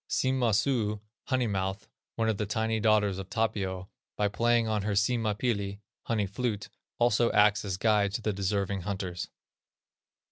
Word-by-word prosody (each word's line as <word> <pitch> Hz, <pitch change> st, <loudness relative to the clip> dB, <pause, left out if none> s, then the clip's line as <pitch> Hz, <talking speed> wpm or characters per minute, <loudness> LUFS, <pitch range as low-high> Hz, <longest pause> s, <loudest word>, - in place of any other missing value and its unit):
Sima 130 Hz, -2 st, +1 dB
suu 110 Hz, -2 st, +1 dB, 0.3 s
(honey 130 Hz, -3 st, +1 dB
mouth), 95 Hz, -1 st, -2 dB, 0.3 s
one 115 Hz, -1 st, 0 dB
of 110 Hz, -2 st, +1 dB
the 105 Hz, -, -2 dB
tiny 110 Hz, +1 st, 0 dB
daughters 105 Hz, -3 st, +2 dB
of 95 Hz, -, -7 dB
Tapio, 95 Hz, -5 st, -1 dB, 0.3 s
by 105 Hz, -1 st, +2 dB
playing 115 Hz, +2 st, +2 dB
on 110 Hz, -1 st, 0 dB
her 105 Hz, +1 st, -1 dB
Sima 110 Hz, +1 st, +1 dB
pilli 100 Hz, -5 st, -1 dB, 0.3 s
(honey 110 Hz, -3 st, 0 dB
flute), 105 Hz, +1 st, -3 dB, 0.3 s
also 120 Hz, 0 st, +3 dB
acts 105 Hz, 0 st, +4 dB
as 95 Hz, -3 st, -3 dB
guide 105 Hz, -2 st, +2 dB
to 115 Hz, -, -2 dB
the 105 Hz, -, 0 dB
deserving 100 Hz, 0 st, -1 dB
hunters. 95 Hz, -2 st, -4 dB
105 Hz, 155 wpm, -29 LUFS, 100-115 Hz, 0.3 s, acts